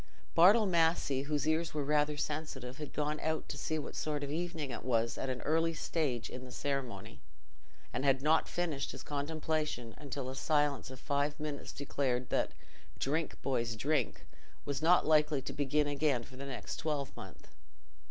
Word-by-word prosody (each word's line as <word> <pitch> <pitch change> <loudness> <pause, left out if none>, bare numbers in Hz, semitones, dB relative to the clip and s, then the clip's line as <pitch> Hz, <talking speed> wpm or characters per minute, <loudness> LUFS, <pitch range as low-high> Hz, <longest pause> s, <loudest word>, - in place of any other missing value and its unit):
Bartle 200 +7 +7
Massey, 165 -6 +3
whose 150 -1 +1
ears 160 0 +1
were 150 - 0
rather 150 +1 +2
sensitive, 145 -4 -3
had 150 - -5
gone 150 0 -1
out 160 0 -1
to - - -3
see 155 - -1
what 150 - -5
sort 150 -2 -1
of 140 - -3
evening 165 -3 -2
it 120 - -5
was 115 -2 +1
at 135 - -3
an 125 -1 -2
early 165 +1 +2
stage 145 -7 -1
in 125 - -7
the 125 - -10
ceremony, 130 - -3 0.7
and - - -1
had 135 -1 +3
not 155 +2 +4
finished 165 -6 -2
his - - -8
contemplation 150 -4 -2
until 140 -2 -4
a 130 - -4
silence 145 -2 +1
of 130 -1 -9
five 145 +1 0
minutes 150 -1 -4
declared 130 -3 -1
that - - +1 0.4
"Drink, 155 +4 -1
boys, 120 -4 0
drink!" 140 +1 0 0.4
was 140 -1 -2
not 175 +3 +5
likely 150 -2 +4
to - - -4
begin 145 +1 +2
again 145 -4 +1
for 130 - -13
the 140 +2 -6
next 130 -2 -5
twelvemonth. 140 - -4
145 Hz, 170 wpm, -34 LUFS, 130-155 Hz, 0.7 s, Bartle